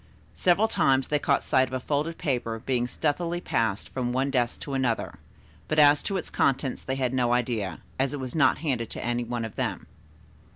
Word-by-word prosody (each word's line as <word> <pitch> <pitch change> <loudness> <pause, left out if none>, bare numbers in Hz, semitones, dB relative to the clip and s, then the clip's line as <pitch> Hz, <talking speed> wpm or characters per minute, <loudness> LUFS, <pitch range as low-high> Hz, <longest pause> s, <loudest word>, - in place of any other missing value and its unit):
Several 185 +5 +3
times 135 -10 +2
they 150 - +2
caught 140 -1 +1
sight 130 0 +3
of 130 - -11
a - - -1
folded 150 +5 -2
paper 120 -5 -1
being 120 +1 -1
stealthily 170 +6 -1
passed 110 - -1
from 125 -2 -2
one 135 +2 0
desk 120 -3 0
to 140 - -5
another, 130 -4 -1 0.5
but 155 - -1
as 145 -1 +7
to 195 - -2
its - - -5
contents 135 -1 +1
they 130 - -3
had 130 -2 -1
no 120 -2 +2
idea, 115 -8 -1 0.2
as 135 0 +1
it 145 - -4
was 130 -1 -5
not 155 - +4
handed 130 -8 -2
to - - -6
any 120 0 0
one 120 -1 -3
of 110 - -8
them. - - -2
130 Hz, 205 wpm, -27 LUFS, 120-145 Hz, 0.5 s, as